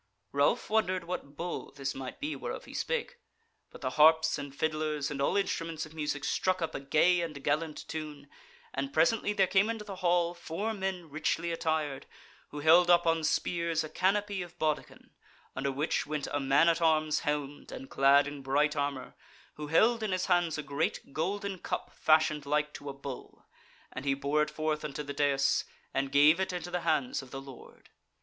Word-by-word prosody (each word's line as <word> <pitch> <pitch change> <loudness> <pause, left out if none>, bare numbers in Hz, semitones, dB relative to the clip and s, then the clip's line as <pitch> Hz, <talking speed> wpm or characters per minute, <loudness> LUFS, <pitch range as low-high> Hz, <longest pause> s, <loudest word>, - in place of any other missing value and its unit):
Ralph 140 +1 +2
wondered 185 -5 +1
what 170 -5 -6
bull 175 +1 -4
this 140 -1 -3
might 130 -1 -7
be 295 +2 -3
whereof - - -6
he - - -12
spake; 485 0 -2 0.5
but - - -13
the 130 -2 -2
harps 160 +2 +5
and 140 -1 -6
fiddlers, 155 0 -1
and 140 -1 -3
all 140 - +2
instruments 165 -5 -2
of 155 - -14
music 150 -2 -3
struck 185 +5 +1
up 165 - -2
a - - -3
gay 160 +6 +3
and 150 -5 -5
gallant 155 +1 -1
tune, 150 -2 -6 0.5
and 135 0 -3
presently 205 +8 +2
there 200 -2 +3
came 195 +3 +3
into 225 -2 -4
the 195 -2 -7
hall 175 -1 +2
four 175 +6 -4
men 190 -5 -4
richly 165 +3 -1
attired, 155 -4 -2 0.4
who 145 - -6
held 170 +3 +6
up 175 -1 +6
on 165 -1 +2
spears 165 +1 0
a 155 - -6
canopy 200 +2 0
of 175 -1 -9
bawdekin, 155 -2 -3 0.4
under 135 +1 -1
which 145 +4 -1
went 150 -1 -2
a 145 - 0
man 140 +4 +4
at 170 0 +3
arms 155 -2 +3
helmed, 145 -1 -3
and 135 - -8
clad 140 +1 +5
in 145 -1 -7
bright 145 +3 +1
armour, 140 -3 -3 0.4
who 150 0 -7
held 220 +9 +4
in 215 -2 -1
his 185 0 0
hands 175 -4 +2
a 150 - -4
great 140 0 -2
golden 200 +3 -2
cup - - -4
fashioned 155 -2 +2
like 150 +1 0
to 145 - -7
a - - -5
bull, 140 -2 -9 0.5
and 130 - -6
he 140 -1 +1
bore 140 +2 +1
it 150 - +1
forth 155 -1 -2
unto 150 0 -4
the 140 0 -6
dais, 140 -1 +2 0.3
and 135 0 -1
gave 150 +4 +6
it 190 - 0
into 175 -1 -5
the 180 - -1
hands 155 -7 0
of 135 - -13
the 135 - -6
Lord. 135 -2 -13
155 Hz, 195 wpm, -30 LUFS, 145-175 Hz, 0.5 s, held